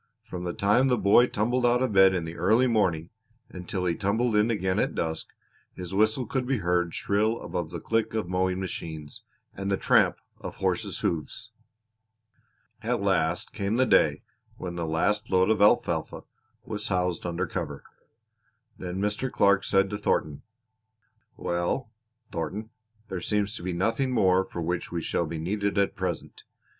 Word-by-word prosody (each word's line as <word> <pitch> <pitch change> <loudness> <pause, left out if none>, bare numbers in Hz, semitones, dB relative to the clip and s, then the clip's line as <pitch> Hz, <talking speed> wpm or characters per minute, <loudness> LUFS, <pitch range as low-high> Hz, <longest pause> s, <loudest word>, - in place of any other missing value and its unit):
From 90 0 -6
the 85 - -2
time 105 +7 +3
the 125 -2 +2
boy 105 +4 +5
tumbled 120 +4 0
out 120 +1 +3
of 125 -5 -1
bed 95 -1 +6
in 85 -2 -2
the 80 +1 -7
early 110 +9 +3
morning 95 -9 +1 0.4
until 90 0 -4
he 85 - +2
tumbled 110 +5 0
in 105 +2 +3
again 95 -4 0
at - - 0
dusk 80 -1 -2 0.5
his 90 0 -7
whistle 110 +5 +2
could 125 +2 -2
be 135 -1 +1
heard 90 -3 0
shrill 110 +3 +1
above 85 -3 -4
the 85 0 -6
click 115 +4 -1
of 110 -5 -1
mowing 90 0 0
machines, 80 -5 -6 0.3
and 95 +1 -4
the 100 - +1
tramp - - +3 0.2
of - - -7
horses' - - -1
hoofs. 80 -4 -3 1.3
At - - 0
last 80 +2 0
came 100 +1 -1
the 130 +2 +3
day - - +3 0.3
when 90 -1 -5
the 85 -1 -3
last 80 +6 0
load 95 +2 +3
of 110 - +1
alfalfa 105 - +2 0.4
was 105 -1 -4
housed 90 -2 0
under 85 +1 -2
cover; - - -5 1.0
then 90 -1 -5
Mr. 105 +6 -1
Clark 100 -1 +3
said 95 0 +3
to 105 - -3
Thornton: 75 -7 0 1.0
"Well, 85 +8 -2 0.4
Thornton, 95 +7 -4 0.4
there 90 -2 -4
seems 105 +2 -1
to - - -8
be 90 +1 -3
nothing 115 +9 0
more 95 -6 +3
for 85 - -5
which 85 +1 -2
we 85 -2 -3
shall 85 - -1
be 80 - -4
needed 100 +5 -1
at 100 -1 +2
present. - - -4
95 Hz, 170 wpm, -27 LUFS, 85-110 Hz, 1.3 s, bed